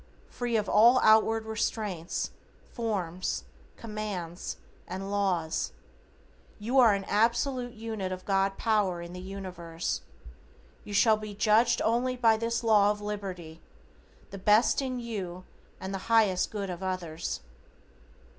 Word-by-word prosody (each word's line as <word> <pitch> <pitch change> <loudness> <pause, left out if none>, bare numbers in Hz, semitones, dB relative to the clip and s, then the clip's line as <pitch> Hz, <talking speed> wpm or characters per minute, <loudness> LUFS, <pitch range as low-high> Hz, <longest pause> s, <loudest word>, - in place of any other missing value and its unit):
Free 240 -1 -2
of 210 -2 -1
all 235 +6 +6
outward 220 +1 +4
restraints, 210 -5 -2 0.4
forms, 185 -6 -2 0.3
commands 210 -6 -5 0.3
and 190 +2 -5
laws 185 -6 0 0.8
you 240 +6 +1
are 225 -5 +7
an 195 - -3
absolute 240 +4 +1
unit 220 -4 -4
of 185 0 -6
God 195 0 +1
power 210 -6 +1
in 170 +1 -9
the 180 - -7
universe. 180 -3 -5 0.8
You 205 - -6
shall 220 +1 +5
be 215 -1 -7
judged 220 +3 +3
only 245 +3 +1
by 225 -3 +5
this 230 +1 -2
law 210 -3 +5
of 210 0 -1
liberty, 190 -6 -6 0.7
the 195 - -7
best 210 +7 +4
in 255 -2 -3
you 190 -7 -5 0.4
and 190 +1 -5
the 195 - -2
highest 215 -5 +3
good 200 -3 -4
of 175 - -7
others. 180 -4 -3
205 Hz, 130 wpm, -29 LUFS, 185-225 Hz, 0.8 s, are